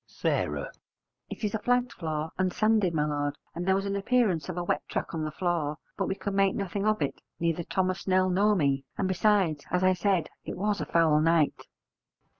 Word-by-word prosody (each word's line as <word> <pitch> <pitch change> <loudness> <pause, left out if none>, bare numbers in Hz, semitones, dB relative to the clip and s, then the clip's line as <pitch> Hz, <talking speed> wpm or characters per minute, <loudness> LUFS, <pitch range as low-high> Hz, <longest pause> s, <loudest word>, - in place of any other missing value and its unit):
S. - - -15 1.0
It - - -8
is 210 - 0
a 220 - 0
flagged 245 +2 +1
floor 155 -1 -3
and 185 -1 +2
sanded, 215 -2 +2
my 150 -2 +1
lord, 145 -1 -2 0.2
and 175 +2 -4
there 190 - +4
was 195 +1 -1
an 200 0 -1
appearance 200 - +1
of 180 - -4
a 175 - -1
wet - - 0
track - - -3
on 160 -1 -2
the 155 - -2
floor, 155 -2 -1 0.2
but - - -1
we 190 - -1
could 200 0 -4
make 195 -1 +3
nothing 200 +1 -2
of 215 -6 +2
it, 140 - -4 0.2
neither 170 0 0
Thomas 185 +2 -1
Snell 185 -1 +2
nor 205 +3 +3
me, 140 -6 +1
and 195 - 0
besides, 185 -5 +2
as 180 +1 +1
I 185 0 +5
said, 185 -3 +1
it - - -6
was 205 +2 0
a - - -4
foul 160 -3 +4
night. 165 -2 +2
185 Hz, 215 wpm, -28 LUFS, 160-200 Hz, 1.0 s, I